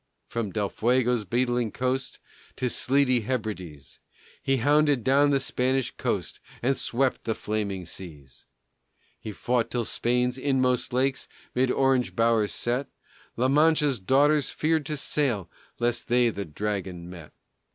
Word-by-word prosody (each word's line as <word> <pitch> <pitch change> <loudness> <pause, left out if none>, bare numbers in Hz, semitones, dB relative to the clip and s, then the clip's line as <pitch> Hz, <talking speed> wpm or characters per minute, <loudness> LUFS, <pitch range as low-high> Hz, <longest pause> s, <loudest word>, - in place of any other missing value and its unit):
From 115 -3 -3
Del 105 -1 -1
Fuego's 120 +1 +1
beetling 120 +2 0
coast 130 +1 -2 0.4
To 125 -2 -1
sleety 130 -2 +2
Hebrides, 100 - -5 0.4
He 135 0 +1
hounded 145 0 +3
down 140 +3 +4
the 140 -1 +3
Spanish 130 -1 0
host, - - -2 0.2
And 135 +3 +2
swept 130 +1 0
the 110 - -1
flaming 100 -4 -3
seas. 80 -7 -11 0.7
He 110 - -6
fought 120 +3 -1
till 120 - -1
on - - -4
Spain's 125 +3 0
inmost 130 -2 +1
lakes 130 +2 0 0.3
'Mid 130 +1 +2
orange 135 -1 +1
bowers 115 -2 +2
set, 125 +4 -1 0.5
La 125 +2 +2
Mancha's 150 -2 +3
daughters 140 +7 +3
feared 155 -2 0
to 150 - -2
sail 130 - -1 0.3
Lest 120 0 -1
they 120 -1 +3
the 100 -2 -5
Dragon 95 0 -4
met. 85 -4 -11
125 Hz, 140 wpm, -26 LUFS, 110-135 Hz, 0.7 s, down